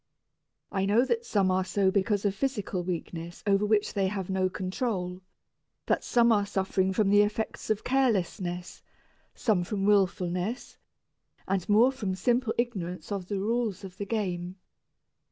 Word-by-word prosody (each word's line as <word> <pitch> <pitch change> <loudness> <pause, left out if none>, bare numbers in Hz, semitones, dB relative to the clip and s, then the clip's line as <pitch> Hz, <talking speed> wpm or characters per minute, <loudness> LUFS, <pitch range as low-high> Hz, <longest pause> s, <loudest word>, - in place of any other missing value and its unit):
I 195 -1 0
know 225 +5 +4
that 465 - -1
some 195 -3 +2
are 185 0 +2
so 190 0 +1
because 200 +1 +1
of 200 - +2
physical 205 -5 -2
weakness 170 -1 -5
over 200 0 +3
which 210 -1 +2
they 195 -1 +1
have 190 -1 -3
no 190 -1 +1
control, 185 -1 -3 0.6
that - - +1
some 235 -1 +4
are 205 -2 +4
suffering 190 -1 0
from 195 +1 +2
the 205 0 +7
effects 210 +1 -2
of 215 -1 0
carelessness, 190 -8 0 0.5
some 205 -7 +1
from 195 +1 -2
wilfulness, 190 +2 0 0.7
and 195 -1 -1
more 225 +5 +6
from 210 -8 -3
simple 240 +4 +1
ignorance 180 -8 -3
of 195 -3 -3
the 200 - -2
rules 220 -1 -1
of 185 -1 -10
the 200 - -4
game. 180 -5 -2
200 Hz, 155 wpm, -28 LUFS, 185-215 Hz, 0.7 s, the